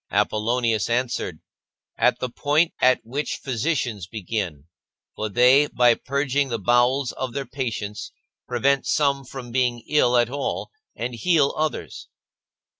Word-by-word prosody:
Apollonius 115 -1 +1
answered: 120 -9 -2 0.3
" - - -41
At - - +3
the 125 - -3
point 150 +6 +1
at 130 0 +4
which 140 +6 -3
physicians 125 - -2
begin, 95 -8 -4 0.5
for 110 - -3
they, 125 +7 +5
by 120 -3 +4
purging 140 +2 -1
the 115 - -1
bowels 120 +5 +2
of 130 -2 -5
their 140 -1 -3
patients 110 -7 -5 0.4
prevent 135 +3 +1
some 140 -2 +1
from 125 -2 -9
being 125 -1 0
ill 125 -5 +3
at 120 0 +2
all, 140 0 -3 0.2
and 120 +1 -4
heal 150 +2 +2
others." 155 0 -3
125 Hz, 135 wpm, -23 LUFS, 115-140 Hz, 0.5 s, they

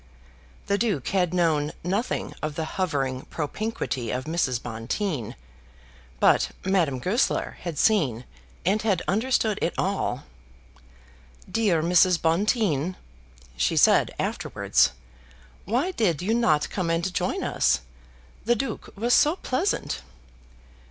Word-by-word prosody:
The 200 0 0
Duke 205 - 0
had 180 -3 +1
known 160 -4 +1
nothing 200 +8 -2
of 155 -1 -3
the 160 - -2
hovering 140 -8 -2
propinquity 150 - -3
of 125 +3 -2
Mrs. 155 -7 0
Bonteen, 120 - -3 0.8
but - - +4 0.2
Madame 175 -8 +2
Goesler 195 - 0
had 170 -4 -5
seen 135 - +2 0.4
and 200 +4 +2
had 200 -5 +1
understood 220 0 +1
it 170 - 0
all. 190 -9 -1 1.2
"Dear 185 -5 +1
Mrs. 175 0 +4
Bonteen," 180 - +1 0.6
she 60 +1 +1
said - - +5
afterwards, - - +1 0.8
"why 250 - 0
did 180 - 0
you 215 +4 +1
not 155 -11 +2
come 180 -4 -2
and 170 +2 0
join - - -1
us? - - +2 0.6
The 240 +2 +3
Duke 270 +4 -4
was 235 +4 +1
so 300 +7 +5
pleasant." 370 +3 -1
180 Hz, 120 wpm, -25 LUFS, 150-215 Hz, 1.2 s, said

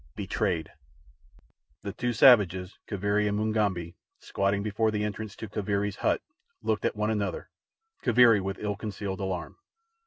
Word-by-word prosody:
Betrayed 95 -4 -2 1.1
The 100 -1 -4
two 120 +3 -1
savages, 100 -6 +5
Kaviri 100 +1 0
and 105 - -1
Mugambi, 105 -6 0 0.2
squatting 100 +1 -1
before 110 +1 +1
the 105 -1 -1
entrance 105 0 -4
to 110 - -7
Kaviri's 100 0 -2
hut, - - 0 0.4
looked 110 -1 0
at - - 0
one 105 +1 0
another—Kaviri 120 - +1
with 95 +1 -3
ill 105 -1 -2
concealed 100 -2 -5
alarm. 95 -2 -4
105 Hz, 130 wpm, -28 LUFS, 100-110 Hz, 1.1 s, savages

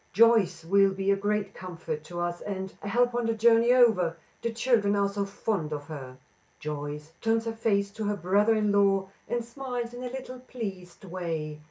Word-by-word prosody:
Joyce 200 -6 +4
will 195 +3 +5
be 195 +1 0
a - - +4
great 205 0 -1
comfort 165 -4 -6
to 175 +1 -6
us, 175 0 -2
and 190 -2 -5
a - - -6
help 245 +3 +2
on 240 -1 0
the 230 - +1
journey 230 +1 +5
over, 220 -10 +4 0.2
the 235 - -1
children 225 -3 +2
are 200 0 +2
so 200 0 -2
fond 195 -5 -2
of 145 -1 -3
her." 135 -4 -8 0.4
Joyce 150 +1 -5
turns 225 0 +1
her 225 - -2
face 205 -3 +1
to 215 +1 -5
her 205 0 0
brother 205 +5 +3
in 210 -1 +2
law 195 -1 +3 0.2
and 240 -1 -1
smiles 245 -1 -5
in 245 - -7
a 250 - -4
little 255 0 -7
pleased 195 -8 -7
way. 165 -4 -4
200 Hz, 195 wpm, -28 LUFS, 180-230 Hz, 0.4 s, will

